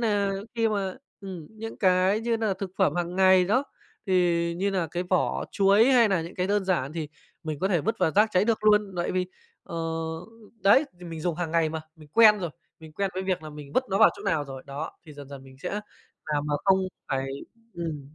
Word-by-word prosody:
nà 205 -3 +1 0.2
khi 230 -1 +2
mà, 195 -3 -2 0.3
ừm, 185 -6 -8
những 225 +1 -8
cái 185 +2 +3
như 230 0 0
nà 215 -4 0
thực 190 -1 -6
phẩm 190 - +3
hàng 175 0 -2
ngày 190 -1 +6
đó, 235 +9 +2 0.4
thì 170 -2 +2
như 195 +3 0
nà 185 -4 0
cái 175 +2 -2
vỏ 180 0 0
chuối 200 +3 +4
hay 245 -4 +5
nà 190 -5 +1
những 170 - -9
cái 180 - -1
đơn 205 0 +1
giản 170 -7 0
thì 160 -2 -4 0.3
mình 155 -2 -4
có 190 +5 0
thể 175 -5 +2
vứt 225 +8 -2
vào - - +2
rác 215 +2 +6
cháy 185 +2 +3
được 220 -1 0
luôn 210 -2 +4
tại 175 - -1
vì, 185 0 0 0.4
ờ, 170 - -8 0.9
đấy, 235 +10 +6
thì 180 - -11
mình 165 -1 -6
dùng 170 0 -1
hàng 175 -3 -3
ngày 165 -1 +2
mà, 160 0 -4 0.2
mình 155 -1 -15
quen 215 0 +7
rồi, 175 -5 -3 0.3
mình 160 -1 -12
quen 195 +4 -1
với 185 - -2
việc 185 -3 -1
nà 155 - -8
mình 150 -1 -10
vứt 255 - +2
nó 195 - +1
vào 220 - +8
chỗ - - -10
nào 155 -3 0
rồi. 135 -2 -8
Đó, 140 +3 -5 0.2
thì 155 - -11
dần 145 -2 -11
dần 140 -1 -9
mình 130 0 -15
sẽ - - -5 0.6
làm 145 0 0
mà 150 - 0
không 190 -1 +5 0.3
phải 135 0 -1 0.5
ừm, 155 -4 -6
185 Hz, 235 wpm, -26 LUFS, 160-200 Hz, 0.9 s, vào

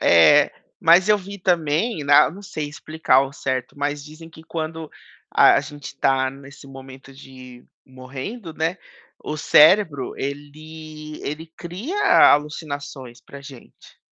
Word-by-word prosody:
É, 85 -2 +5 0.3
mas 175 +4 +5
eu 210 -1 +4
vi 200 +1 -10
também 170 +1 -1
na 145 0 +5
não 195 +4 -12
sei 155 -7 -6
explicar 155 -2 -1
ao 135 +1 +2
certo, 130 -2 -4
mas 145 0 -3
dizem 155 +2 -13
que 160 - -15
quando 160 -1 -6 0.4
a - - +5
a - - +2
gente 145 -1 -10
tá 130 -1 +1
nesse 140 +1 -14
momento 135 0 -13
de 130 -2 -14 0.2
morrendo, 135 - -9
né, 165 +4 -2 0.5
o 150 - -4
cérebro 155 -2 +4
ele 155 +2 -8
ele 155 +3 -6
cria 275 - +3
alucinações 145 -4 -6
pra 140 - -13
gente. 140 -3 -15
150 Hz, 135 wpm, -21 LUFS, 135-165 Hz, 0.5 s, É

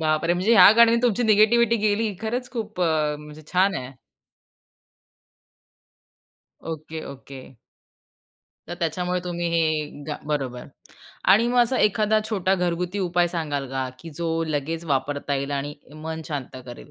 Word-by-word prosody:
बापरे! 155 +2 +1
म्हणजे 190 +6 +1
ह्या 190 0 +9
गाण्यानी 235 0 +6
तुमची 245 -1 +2
निगेटिव्हिटी 230 +2 +4
गेली. 210 0 0
खरंच, 245 +3 -3
खूप 215 -5 -5
अ, 155 -3 +1
म्हणजे 150 +1 -12
छान 190 +2 +3
आहे. 130 -2 -5 2.7
Okay, 160 0 -7
okay. 135 -1 -11 1.3
तर 175 - -4
त्याच्यामुळे 180 +2 -1
तुम्ही 175 -1 -3
हे 155 -3 -1
गा 150 - -3
बरोबर 135 -5 -3 0.7
आणि 230 +4 +4
मग 245 - +1
असा 250 +2 0
एखादा 215 0 +3
छोटा 195 -3 +1
घरगुती 180 +1 -2
उपाय 175 -2 +1
सांगाल 150 -6 -3
का, 130 -1 -2
की 165 +3 -10
जो 170 +1 -2 0.2
लगेच 160 +2 -3
वापरता 145 0 -1
येईल 140 +1 -3
आणि 145 +1 -3 0.2
मन 160 +1 -6
शांत 140 -4 -5
करेल, 120 -1 -11
170 Hz, 140 wpm, -24 LUFS, 150-205 Hz, 2.7 s, ह्या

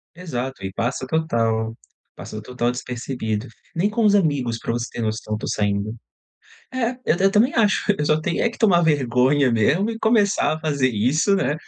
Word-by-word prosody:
Exato, 135 - -5
e 95 0 -4
passa 125 +3 -2
total, 115 -8 0 0.4
passa 105 - -8
total 120 +1 -1
despercebido. 125 -3 -4 0.3
Nem 185 +5 +1
com 225 +1 -1
os 205 -1 +5
amigos, 145 - +1
para 115 - -3
você 120 0 -2
ter - - -5
noção, 110 -1 -3
eu - - +1
estou - - -6
saindo. 105 +1 -1 0.8
É, 255 -2 0
eu 165 - +2
eu 195 +1 +4
também 220 +7 +3
acho, 210 -3 +2
eu 150 - 0
só 155 +1 +2
tenho 170 +2 -1
é 235 - +3
que 230 - -11
tomar 190 -7 +4
vergonha 135 -3 +2
mesmo 155 - +2
e 225 - -5
começar 210 -7 +2
a - - -6
fazer 145 -5 +1
isso, 130 - +2
né? 170 -6 0
135 Hz, 190 wpm, -22 LUFS, 115-190 Hz, 0.8 s, os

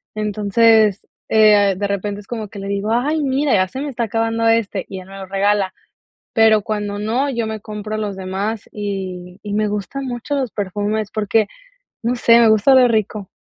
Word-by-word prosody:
entonces, 215 0 +3 0.2
eh, 210 -3 +5
de 200 +1 -1
repente 200 +1 -3
es 200 - -20
como 225 -3 -5
que 200 - -10
le 195 - -6
digo: 200 +2 -2
"ay, 295 +7 +1
mira, 275 0 +1
ya 185 -2 +3
se 260 +8 -6
me 290 - -3
está 245 -3 -3
acabando, 225 +1 0
este", 225 -4 +1
y 190 - -7
él 185 - -12
me 195 - -10
lo 195 - -7
regala, 195 0 +1 0.6
pero, 220 -1 +5
cuando 205 -1 -3
no, 235 +7 0
yo 235 -3 -2
me 220 0 -5
compro 215 0 -6
los 210 -2 -3
demás, 195 +3 -4
y 185 -3 -5
y 205 -1 -4
me 215 0 +1
gustan 210 +7 -4
mucho 245 +3 -4
los 265 -4 -1
perfumes, 205 +1 -2
porque, 215 0 +1 0.6
no 235 +2 0
sé, 235 -1 +5
me 235 - +6
gusta 220 +4 +4
oler 255 -2 +6
rico. 215 -2 -1
215 Hz, 195 wpm, -19 LUFS, 200-230 Hz, 0.6 s, me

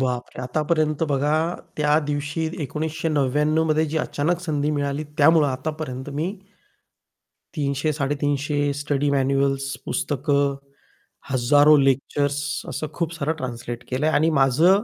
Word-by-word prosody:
बापरे! 125 -1 -2
आतापर्यंत 155 +3 0
बघा 145 +2 +1 0.4
त्या 150 0 +3
दिवशी 150 +2 -2
1999 150 0 0
मध्ये 155 0 +2
जी 155 +1 -3
अचानक 160 +3 -1
संधी 150 -4 -1
मिळाली 145 0 -1
त्यामुळं 155 +1 +6
आतापर्यंत 130 0 -4
मी, 160 +6 -1 1.2
300-350 145 0 0
स्टडी 145 0 -1
मॅन्युअल्स, 135 0 +1
पुस्तकं, 140 0 0 0.8
हजारो 145 +4 +5
लेक्चर्स 140 +1 +1 0.3
असं 155 - -3
खूप 170 -1 -2
सारं 155 -1 -1
ट्रान्सलेट 120 -3 -5
केलंय 135 +5 +1
आणि 160 +1 +3
माझं 165 +10 +4
145 Hz, 110 wpm, -23 LUFS, 140-155 Hz, 1.2 s, त्यामुळं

